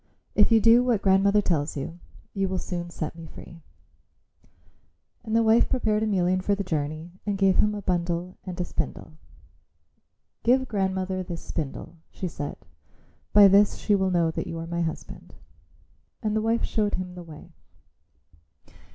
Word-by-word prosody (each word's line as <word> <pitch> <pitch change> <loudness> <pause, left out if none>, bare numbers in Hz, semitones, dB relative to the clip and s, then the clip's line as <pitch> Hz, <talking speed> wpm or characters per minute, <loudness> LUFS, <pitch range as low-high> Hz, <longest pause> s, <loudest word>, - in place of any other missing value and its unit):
If 210 +2 +4
you 225 - +6
do 230 +3 +6
what 240 -5 +1
grandmother 200 +2 +4
tells 155 -5 -1
you, 165 +5 -6 0.3
you 195 -1 0
will 190 0 -2
soon 175 -1 -4
set 165 -2 -5
me 165 -1 -10
free." 165 +1 -12 1.6
And 220 -1 -2
the 230 - +4
wife 225 +1 +4
prepared 215 -5 +1
Emelian 185 -4 +1
for 200 +2 +1
the 200 - -3
journey 155 -1 -3
and 205 -1 -2
gave 195 -1 +3
him 210 0 +3
a 205 - -6
bundle 175 0 -1
and 185 -2 -7
a 180 - 0
spindle. 160 - -5 1.3
"Give 260 +2 +3
grandmother 190 -2 -1
this 175 -2 -6
spindle," 160 +2 -5
she 185 - -5
said; 145 -3 -6 0.7
"by 205 -1 +8
this 200 +1 +5
she 210 - 0
will 190 -1 +2
know 170 -3 +2
that - - -4
you 165 - -5
are 165 - -5
my 170 +1 -3
husband." 160 -2 -6 0.9
And 215 -1 0
the 220 - +1
wife 225 +1 +1
showed 210 -2 0
him 180 -1 -5
the 180 - -9
way. 160 -3 -12
190 Hz, 165 wpm, -26 LUFS, 170-210 Hz, 1.6 s, by